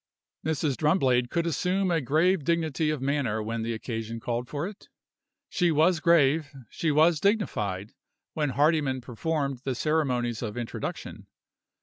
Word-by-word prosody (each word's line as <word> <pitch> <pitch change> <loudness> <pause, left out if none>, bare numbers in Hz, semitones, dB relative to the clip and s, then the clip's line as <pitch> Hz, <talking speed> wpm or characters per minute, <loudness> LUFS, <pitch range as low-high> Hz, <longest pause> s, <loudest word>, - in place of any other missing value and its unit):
Mrs. 155 -3 -1
Drumblade 130 -7 +2
could 170 +3 0
assume 180 +4 0
a 165 -2 +2
grave 155 +6 +2
dignity 160 -1 0
of 150 -4 -2
manner 130 -6 0
when 115 +1 -3
the 115 +1 -2
occasion 115 0 -5
called 120 +1 -3
for 150 +5 -3
it. 205 -1 -12 0.6
She 175 -2 +1
was 160 +2 +3
grave, 155 -3 +3 0.2
she 165 - -1
was 155 +2 +4
dignified, 105 - -1 0.4
when 150 -2 0
Hardyman 145 -3 +2
performed 140 +2 -2
the 130 0 -3
ceremonies 125 -6 0
of 110 -1 -4
introduction. 120 -1 -6
145 Hz, 140 wpm, -27 LUFS, 120-165 Hz, 0.6 s, was